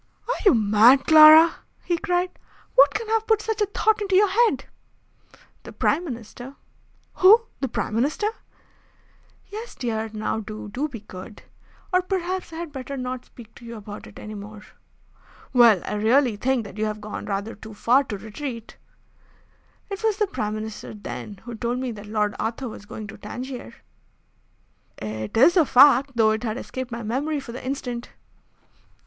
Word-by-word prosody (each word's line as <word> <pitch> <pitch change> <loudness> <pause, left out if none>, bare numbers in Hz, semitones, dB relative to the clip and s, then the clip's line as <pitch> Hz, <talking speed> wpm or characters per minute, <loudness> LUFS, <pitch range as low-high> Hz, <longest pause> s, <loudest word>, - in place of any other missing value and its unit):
"Are - - +1
you 380 - +7
mad, 220 +5 +5
Clara!" 315 +1 +8 0.3
he 345 - 0
cried. 360 -1 0 0.4
"What 280 +2 +6
can 445 +1 -3
have 445 0 0
put 440 -1 +3
such 435 0 -3
a 415 - +2
thought 425 +1 +1
into 390 -2 0
your 405 +1 +5
head?" 460 +3 +2 1.0
"The - - -11
Prime 345 - 0
Minister." 245 -1 -8 0.6
"Who? 425 +5 +7 0.2
The 270 - -1
Prime 225 - -3
Minister?" 280 - 0 1.3
"Yes, 440 +3 -7
dear. 225 -3 -3
Now 215 0 -2
do, 215 -1 -8
do 270 +8 -2
be 240 -8 -9
good! 200 +1 -11 0.5
Or 365 - +4
perhaps 370 -1 -3
I - - -9
had 335 -1 -6
better 275 0 -6
not 255 0 -5
speak 230 -2 -15
to - - -16
you 235 0 -8
about 205 -1 -9
it - - -15
any 215 - -8
more." 210 +1 -9 0.9
"Well, 235 -7 +6
I - - -4
really 230 +3 +3
think 250 +3 0
that 205 0 -10
you 215 - +1
have 215 0 -3
gone 210 0 -7
rather 200 +3 -3
too 220 0 -12
far 250 +6 +3
to 205 - -5
retreat." 230 +2 -7 1.1
"It 395 +3 -5
was 435 -2 +1
the 425 - +2
Prime 215 - -3
Minister, 215 0 -7
then, 205 -1 -8
who 240 +1 -8
told 235 +2 -2
me 255 -1 -3
that 210 -2 -10
Lord 210 -1 0
Arthur 230 +4 -3
was 205 -2 -10
going 215 - -7
to 210 - -11
Tangier." 245 - -7 1.2
"It 110 - -5
is 300 +10 +6
a 345 - +6
fact, 275 0 +5
though 220 -2 +4
it 220 0 -1
had 225 -1 -3
escaped 260 -1 -6
my 235 0 -5
memory 280 +7 -2
for 265 -3 -9
the 250 - -8
instant." 250 -2 -4
245 Hz, 175 wpm, -24 LUFS, 215-315 Hz, 1.3 s, Clara